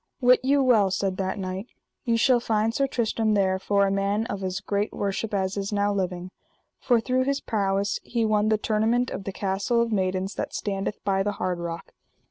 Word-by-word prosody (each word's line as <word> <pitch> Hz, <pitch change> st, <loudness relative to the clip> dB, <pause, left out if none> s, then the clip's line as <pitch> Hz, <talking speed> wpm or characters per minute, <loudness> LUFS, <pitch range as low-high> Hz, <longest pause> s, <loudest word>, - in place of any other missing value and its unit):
Wit 250 Hz, -1 st, +5 dB
you 275 Hz, +2 st, +3 dB
well, 220 Hz, -6 st, +4 dB
said 190 Hz, 0 st, -1 dB
that 190 Hz, 0 st, -2 dB
knight, 190 Hz, +2 st, -4 dB, 0.4 s
ye 230 Hz, -2 st, +2 dB
shall 245 Hz, +1 st, +4 dB
find 225 Hz, -1 st, 0 dB
Sir 275 Hz, +3 st, +1 dB
Tristram 225 Hz, -3 st, 0 dB
there 190 Hz, -2 st, +2 dB
for 200 Hz, +1 st, +2 dB
a 195 Hz, -, 0 dB
man 200 Hz, +2 st, 0 dB
of 200 Hz, -4 st, -5 dB
as 185 Hz, +1 st, -2 dB
great 205 Hz, +1 st, -1 dB
worship 200 Hz, +2 st, -3 dB
as 195 Hz, -1 st, -1 dB
is 200 Hz, +1 st, -3 dB
now 205 Hz, 0 st, +1 dB
living; 185 Hz, -2 st, -3 dB, 0.5 s
for 240 Hz, -2 st, +3 dB
through 255 Hz, +2 st, 0 dB
his 280 Hz, 0 st, 0 dB
prowess 200 Hz, -2 st, -1 dB
he 235 Hz, -2 st, -1 dB
won 215 Hz, 0 st, +2 dB
the 215 Hz, -, +3 dB
tournament 225 Hz, +4 st, +1 dB
of 195 Hz, -, -5 dB
the 195 Hz, -, -3 dB
Castle 195 Hz, +4 st, -1 dB
of 235 Hz, 0 st, +1 dB
Maidens 190 Hz, -1 st, -1 dB
that -, -, -4 dB
standeth 195 Hz, 0 st, -3 dB
by 195 Hz, -1 st, +1 dB
the 205 Hz, +1 st, -1 dB
Hard 180 Hz, -3 st, -2 dB
Rock. 170 Hz, -1 st, -6 dB
205 Hz, 205 wpm, -25 LUFS, 195-230 Hz, 0.5 s, Wit